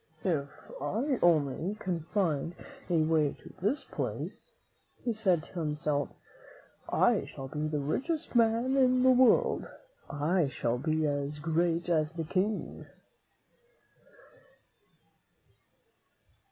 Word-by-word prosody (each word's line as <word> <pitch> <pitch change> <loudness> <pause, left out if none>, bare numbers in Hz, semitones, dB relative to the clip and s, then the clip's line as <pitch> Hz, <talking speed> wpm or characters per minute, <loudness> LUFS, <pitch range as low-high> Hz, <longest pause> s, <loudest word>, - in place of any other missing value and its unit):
"If 150 -7 0 0.3
I 235 - -1
only 165 +3 +2
can 175 -6 -3
find 170 -5 0 0.3
a 165 -3 +3
way 155 -2 +2
to - - -15
this 210 +10 0
place," - - -5 0.5
he 235 - 0
said 185 -7 +2
to 175 - -8
himself, 150 -2 -1 0.8
"I - - +3
shall 135 - -8
be 150 +3 -3
the 150 -1 -1
richest 275 - -2
man 230 +3 +3
in 255 -1 +4
the 260 - +7
world. 255 -1 +4 0.4
I 155 +3 +1
shall 120 -2 -2
be 155 +2 0
as 145 0 -2
great 165 +2 0
as 160 -2 +1
the 165 -1 -3
great 155 - -12
King." 205 +3 -1
165 Hz, 115 wpm, -30 LUFS, 150-210 Hz, 0.8 s, the